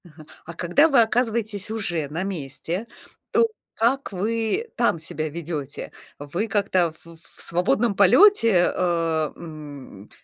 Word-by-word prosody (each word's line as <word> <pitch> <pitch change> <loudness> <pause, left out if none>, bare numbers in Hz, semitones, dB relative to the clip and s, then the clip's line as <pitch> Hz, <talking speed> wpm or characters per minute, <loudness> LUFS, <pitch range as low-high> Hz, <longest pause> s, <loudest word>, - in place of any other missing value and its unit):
Ага. 155 -2 -15 0.2
А 170 - -8
когда 175 - +3
вы 270 -5 +5
оказываетесь 220 -3 0
уже 175 -9 -2
на 165 +5 -3
месте, 180 - -4 0.4
то 465 - +4 0.3
как 250 +3 +1
вы 225 - -1
там 235 -8 +2
себя 155 0 -4
ведете? 150 -3 -6 0.3
Вы 170 +10 -3
как-то 195 -5 +1
в - - -21
в 165 - -9
свободном 200 +5 +1
полете, 205 - +5
э, 165 -3 0
м, 145 - -10
180 Hz, 130 wpm, -23 LUFS, 160-225 Hz, 0.4 s, вы